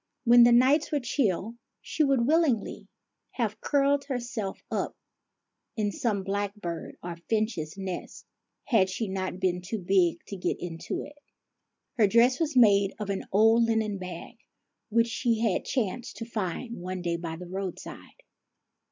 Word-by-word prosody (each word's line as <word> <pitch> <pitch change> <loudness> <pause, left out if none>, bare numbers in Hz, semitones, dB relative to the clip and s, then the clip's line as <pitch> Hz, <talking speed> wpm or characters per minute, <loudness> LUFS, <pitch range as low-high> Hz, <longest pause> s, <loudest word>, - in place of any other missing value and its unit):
When 240 0 +7
the 240 - +6
nights 265 +6 +4
were 295 - +1
chill, 230 -4 -1 0.2
she 310 - -1
would 270 -4 +2
willingly 295 -7 +1 0.5
have 220 -3 -2
curled 280 0 +2
herself 240 -6 -4
up - - -2 0.8
in 210 -1 0
some 225 -9 -1
blackbird 200 -3 -4
or 170 -1 -5
finch's 215 -8 -1
nest, 190 -2 -6 0.4
had 215 -8 +3
she 210 +4 -3
not 185 -1 -3
been 180 -1 0
too 185 +5 -4
big 180 -3 +1
to 200 - -7
get 180 - -2
into 165 -2 -5
it. 290 0 -13 0.8
Her 210 - +6
dress 235 +5 +4
was 310 -5 0
made 200 -4 +5
of 205 -2 -3
an 195 - -3
old 225 +3 +5
linen 220 -3 0
bag, 185 +5 -8 0.5
which 230 +1 +3
she 235 0 0
had 220 -6 +1
chanced 245 -1 -2
to 230 - -5
find 225 0 -4
one 185 0 -5
day 170 -1 0
by 165 -1 -5
the 180 +2 -8
roadside. 190 0 -7
215 Hz, 150 wpm, -28 LUFS, 185-240 Hz, 0.8 s, When